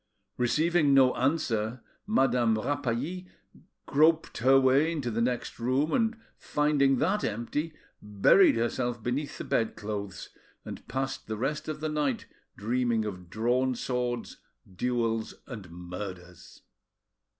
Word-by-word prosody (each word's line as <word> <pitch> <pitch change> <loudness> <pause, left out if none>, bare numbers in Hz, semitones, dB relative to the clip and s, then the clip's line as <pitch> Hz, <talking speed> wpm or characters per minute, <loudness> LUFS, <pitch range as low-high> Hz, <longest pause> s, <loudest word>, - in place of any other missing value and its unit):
Receiving 150 +3 +2
no 130 -2 +6
answer, 125 -5 0 0.3
Madame 125 - +2
Rapally 145 +8 -2 0.6
groped 155 +3 +2
her 135 +3 +6
way 135 +5 +3
into 140 -7 -3
the 115 +1 -1
next 120 0 -2
room, 130 +6 +1
and 225 -2 +1 0.2
finding 145 -2 +2
that 195 +10 +1
empty, 130 +9 -3 0.3
buried 105 - +5
herself 120 0 -1
beneath 135 +5 -2
the - - -5
bedclothes, 105 -4 -3 0.4
and - - -8
passed 135 0 -3
the 110 - -3
rest 135 +6 -2
of 155 -1 -4
the 155 - -1
night 145 -5 -1 0.3
dreaming 115 +1 0
of 90 -4 -7
drawn 125 +6 +1
swords, 125 -1 -3 0.4
duels, 115 0 -1
and 105 -9 -9
murders. 90 0 -9
125 Hz, 120 wpm, -28 LUFS, 110-145 Hz, 0.6 s, no